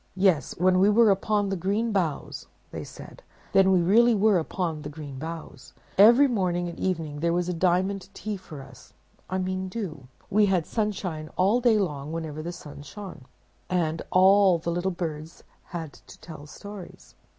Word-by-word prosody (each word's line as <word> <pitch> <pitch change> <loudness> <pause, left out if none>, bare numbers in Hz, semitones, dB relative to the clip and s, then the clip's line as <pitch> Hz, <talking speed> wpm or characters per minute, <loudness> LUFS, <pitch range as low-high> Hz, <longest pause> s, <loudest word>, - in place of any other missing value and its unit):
'Yes, 185 -5 +2
when 185 +1 +3
we 195 +2 +5
were 220 0 +5
upon 205 +1 0
the 195 - -1
green 205 +6 -1
boughs,' 175 -8 -2 0.2
they - - -6
said, - - -12 0.3
'then 190 -1 +5
we 180 -2 +3
really 230 +6 +5
were 205 -2 +3
upon 165 -1 -3
the 150 - -6
green 145 -3 -8
boughs! 160 -4 -8 0.2
Every 235 +8 +7
morning 180 -7 -1
and 170 - -8
evening 160 -5 -2
there 170 +2 +1
was 180 +1 -1
diamond 185 +2 0
tea 215 -1 -4
for 155 -7 -10
us—I 135 +7 -10
mean 185 0 -2
dew; 185 - -6 0.2
we 210 +1 +3
had 185 -4 +1
sunshine 185 -8 -3
all 205 +7 +3
day 235 -3 +4
long 150 -7 -2
whenever 160 -2 -5
the 170 +2 -5
sun 150 -4 -10
shone, 195 -4 -10 0.4
and 165 -3 0
all 190 0 +5
the 170 +1 -3
little 175 +2 -1
birds 165 -3 -6 0.2
had 165 -4 -6
to - - -16
tell 155 -3 -11
stories. 200 +3 -11
180 Hz, 170 wpm, -26 LUFS, 160-200 Hz, 0.4 s, Every